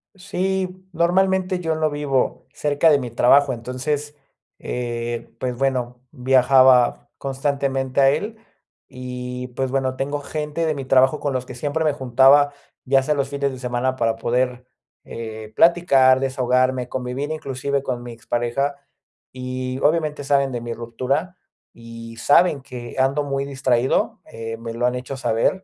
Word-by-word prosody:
Sí, 190 -1 -3
normalmente 185 +1 +1
yo 160 -1 -1
no 155 -1 +1
vivo 145 -3 -1
cerca 150 +2 +2
de 145 -2 +5
mi 120 -3 -5
trabajo. 135 +3 +4
Entonces, 135 +5 -3 0.5
eh, 120 -1 -4
pues 125 -1 -2
bueno, 125 -2 -1
viajaba 130 -2 +4
constantemente 135 -1 -1
a 135 - +6
él 205 +10 -2 0.5
y 125 0 -6
pues 130 -1 -1
bueno, 130 -1 0
tengo 145 +2 -2
gente 150 +2 -3
de 155 -2 0
mi 135 - -5
trabajo 130 +3 +3
con 145 - -1
los 130 -1 -2
que 125 - -9
siempre 150 +4 -2
me 150 - +2
juntaba, 135 +2 +5 0.3
ya 135 0 +3
sea 150 - +1
los 135 -1 -1
fines 140 -1 -2
de 130 - -8
semana, 125 +1 -1
para 115 -3 0
poder, 125 +1 -1 0.4
eh, 110 -1 -8
platicar, 135 -7 +5
desahogarme, 130 -1 +1
convivir 130 +4 -3
inclusive 140 -2 -2
con 125 -3 -4
mi 120 - -8
expareja 120 +4 -2 0.6
y, 130 0 -4
obviamente, 150 -2 0
saben 140 -1 +2
de 120 - -3
mi 120 0 -5
ruptura 135 +10 -3 0.4
y 115 0 -11
saben 145 +4 +4
que 125 -2 -9
ando 135 +3 +2
muy 140 -1 -2
distraído, 130 -2 0
eh, 115 0 -7
me 115 0 -7
lo 120 +1 -1
han 125 0 +1
hecho 125 +2 -5
saber. 130 +10 0
130 Hz, 150 wpm, -22 LUFS, 125-145 Hz, 0.6 s, a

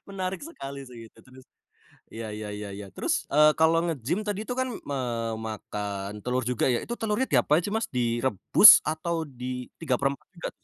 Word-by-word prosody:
Menarik 190 -1 -4
sekali 140 - -8
sih 115 -3 -12
itu - - -25
terus, 130 +2 -17 0.7
ya 110 -1 -7
ya 105 0 -6
ya 105 -1 -6
ya 100 0 -8
terus, - - -2 0.2
eee, 150 +1 +5
kalo 160 +1 +3
nge-gym 165 - -2
tadi 205 -1 -2
tuh 245 - -3
kan 260 0 0 0.2
memakan 110 -5 -4
telur 125 +1 0
juga 125 - 0
ya 125 -2 +1
itu 235 - -5
telurnya 225 +4 -1
diapain 150 +3 +3
sih 190 - -4
Mas? 225 - 0
Direbus 120 -3 +6
atau 160 +2 -2
di 125 -1 -6
3/4 140 -2 -1
juga? 175 - -5
130 Hz, 170 wpm, -26 LUFS, 115-165 Hz, 0.7 s, Direbus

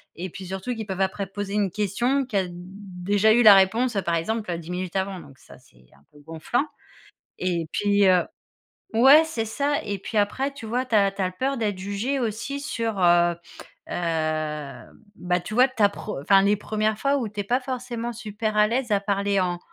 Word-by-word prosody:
et 180 +3 -5
puis 190 +3 -9
surtout 190 +6 -4
qu'ils 220 -1 -5
peuvent 190 0 -3
après 190 0 -1
poser 200 +1 -5
une 200 -4 +1
question, 240 +7 0
qui 215 -5 -2
a 185 -2 0
déjà 195 +3 -1
eu 240 +1 +4
la 210 -2 +10
réponse, 220 +4 +2
par 170 0 +1
exemple, 215 +4 -2
heu, 170 - -2
10 170 +2 -9
minutes 180 0 -4
avant 190 -1 -2
donc 140 -4 -15
ça - - -16
c'est 60 0 -24
un 70 - -26
peu 145 - -18
gonflant 165 - -2 0.7
et 170 -3 -1
puis, 205 -1 +2
heu 180 -1 +4 0.7
ouais, 270 +7 +7
c'est 235 -8 -3
ça, 285 +6 -1
et 200 -2 -4
puis 215 - -5
après, 265 +7 0
tu 240 -5 -10
vois, 250 +3 -1
tu 230 - -1
as 200 -1 +4
tu 195 0 -6
as 185 0 0
peur 265 +7 -2
d'être 210 -4 -1
jugée 205 +8 -2
aussi 235 +5 -3
sur, 225 -7 -3
heu 175 -1 +4 0.5
heu, - - -5 1.2
ben, 180 0 -1
tu 215 - -7
vois? 255 +2 +6
Ta 215 -5 +2
preu 200 -7 -7
enfin, 195 +5 +5
les 205 +1 +3
1res 215 0 -1
fois 280 0 +1
où 235 -5 -2
tu 210 0 -9
n'es - - -8
pas 245 +4 +1
forcément 245 -2 -4
super 215 -1 -4
à 210 0 +5
l'aise 240 0 -2
à 200 - +3
parler 200 0 0
en 175 -1 -1
205 Hz, 210 wpm, -24 LUFS, 185-235 Hz, 1.2 s, la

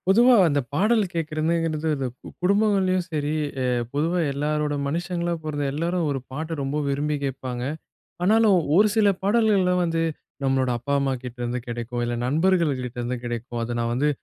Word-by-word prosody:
பொதுவா 240 +6 +6
அந்த 145 -2 +2
பாடல் 215 +8 +3
கேட்கிறதுங்கிறது, 160 0 -1
அந்த 135 -2 -3
கு - - -12
குடும்பங்கள்லயும் 190 -2 +2
சரி 150 -1 -1 0.3
அ - - 0 0.3
பொதுவா 165 +5 +1
எல்லாரோட 150 +1 -1
மனுஷங்களா 175 +3 -2
பொறந்த 145 -2 -2
எல்லோரும் 170 +3 -1
ஒரு 135 - -1
பாட்ட 160 +4 -4
ரொம்ப 135 +2 -2
விரும்பி 145 +2 0
கேட்பாங்க. 130 -2 -4 0.6
ஆனாலும் 215 +1 +5 0.2
ஒரு 210 +4 +6
சில 215 -2 +4 0.2
பாடல்கள்லாம் 200 -4 +3
வந்து, 165 -1 0 0.4
நம்மளோட 135 -1 +1
அப்பா 140 +4 -3
அம்மாகிட்டேருந்து 125 -2 -3
கெடைக்கும். 120 0 -4
இல்லை 120 0 -2
நண்பர்கள் 165 +3 +2
கிட்டேருந்து 125 0 -4
கெடைக்கும். 120 0 -4
"அத 120 +1 -3
நான் 115 0 0
வந்து 140 +5 +2
150 Hz, 150 wpm, -24 LUFS, 130-180 Hz, 0.6 s, பொதுவா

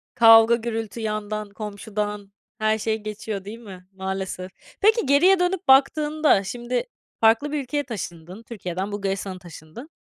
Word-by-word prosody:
Kavga 225 0 +7
gürültü 225 -2 -4
yandan, 215 -1 -3
komşudan, 210 -1 -5 0.3
her 215 0 +1
şey 220 +1 -1
geçiyor 210 -2 -5
değil 220 +3 -8
mi? 190 -5 -12
Maalesef. 190 -1 -5 0.3
Peki 440 0 +4
geriye 350 +8 +5
dönüp 360 -2 -1
baktığında 295 -2 +4
şimdi 240 - -3 0.4
farklı 225 +6 +3
bir 300 - -1
ülkeye 290 +3 -2
taşındın. 185 - -8
Türkiye'den 195 -4 -5
Bulgaristan'a 195 -2 -3
taşındın. 175 - -12
215 Hz, 130 wpm, -23 LUFS, 195-245 Hz, 0.4 s, Kavga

